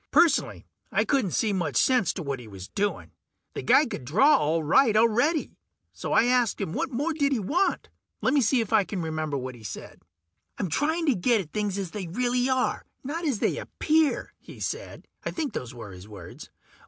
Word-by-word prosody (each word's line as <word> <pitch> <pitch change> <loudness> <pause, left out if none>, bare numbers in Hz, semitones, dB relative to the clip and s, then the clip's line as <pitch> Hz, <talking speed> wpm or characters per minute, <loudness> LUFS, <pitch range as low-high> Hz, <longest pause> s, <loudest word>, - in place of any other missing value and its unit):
Personally, 330 +2 +3 0.3
I - - +2
couldn't 265 -9 +1
see 210 +4 0
much 165 -8 -2
sense 250 -6 +3
to 180 - -5
what 140 -3 -3
he 120 - -11
was 95 -2 -9
doing. 205 0 -2 0.4
The - - -4
guy 305 - +5
could 230 - -6
draw 220 - +5
all 160 - +1
right 215 - +4
already, 245 +8 +2 0.4
so - - -5
I - - +5
asked 245 -2 +2
him 195 -6 -3
what - - -1
more 290 +6 -1
did 285 -2 +1
he 270 - +2
want? 305 - 0 0.3
Lemme 290 - +2
see 240 +2 +3
if 225 -1 -4
I 215 -2 +5
can 190 -2 -4
remember 155 -2 -2
what 130 -1 -5
he 120 -2 -14
said. 105 - -8 0.6
"I'm 190 - -2
trying 315 - 0
to 285 - +4
get 230 +4 +2
at 155 -5 -12
things 210 -2 -2
as 190 -4 -4
they 195 -4 -5
really 245 +7 0
are, 260 -1 0 0.2
not 325 +6 -4
as 270 -7 0
they - - 0
appear," 315 -1 0
he - - -13
said. - - -5 0.2
I - - -2
think 310 -4 -3
those 125 -2 -5
were 110 -4 -9
his 90 +1 -11
words. 100 -5 -11
215 Hz, 205 wpm, -26 LUFS, -, 0.6 s, guy